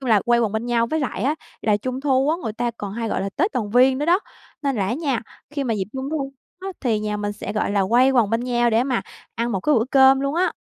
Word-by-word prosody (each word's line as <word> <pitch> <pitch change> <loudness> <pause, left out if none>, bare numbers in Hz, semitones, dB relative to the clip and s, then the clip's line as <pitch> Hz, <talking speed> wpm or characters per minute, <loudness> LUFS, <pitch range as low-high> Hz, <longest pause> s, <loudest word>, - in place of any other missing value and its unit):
chung 260 -3 -3
là 215 -2 +5
quay 240 0 +4
quần 220 -3 0
bên 220 +2 -2
nhau 235 -1 +2
với 315 +6 -1
lại 245 -7 -3
á 280 +5 +1 0.3
là 210 -2 +3
Trung 255 +5 -4
thu 270 0 +2
á, 325 - +1
người 220 - -2
ta 240 +2 -1
còn 200 -1 -5
hay 230 +1 -3
gọi - - -1
là 195 - -2
Tết 375 +8 +1
Đoàn 215 -4 -2
viên 260 +3 +4
nữa 295 - -1
đó, 355 +3 +4 0.4
nên 275 -2 0
là 195 -3 0
á 205 - -1
nha, 275 -5 -1 0.3
khi 290 -2 -3
mà 230 -4 0
dịp 195 - -1
Trung 265 +1 -4
thu 275 -3 -3 0.3
á 385 - -5
thì 230 -5 +1
nhà 210 0 -2
mình 205 0 -3
sẽ, 205 0 -6
gọi 210 - -1
là, 200 -1 +2
quây 250 +3 +5
quần 235 -6 +3
bên 230 - +1
nhau 240 -1 +2
để 230 +2 +3
mà 255 -3 0 0.3
ăn 235 +1 -1
một 195 - -1
cái 300 +9 +2
bữa 225 - +3
cơm 270 -1 +6
luôn 275 +1 -1
á. 365 +2 +1
240 Hz, 300 wpm, -22 LUFS, 220-275 Hz, 0.4 s, cơm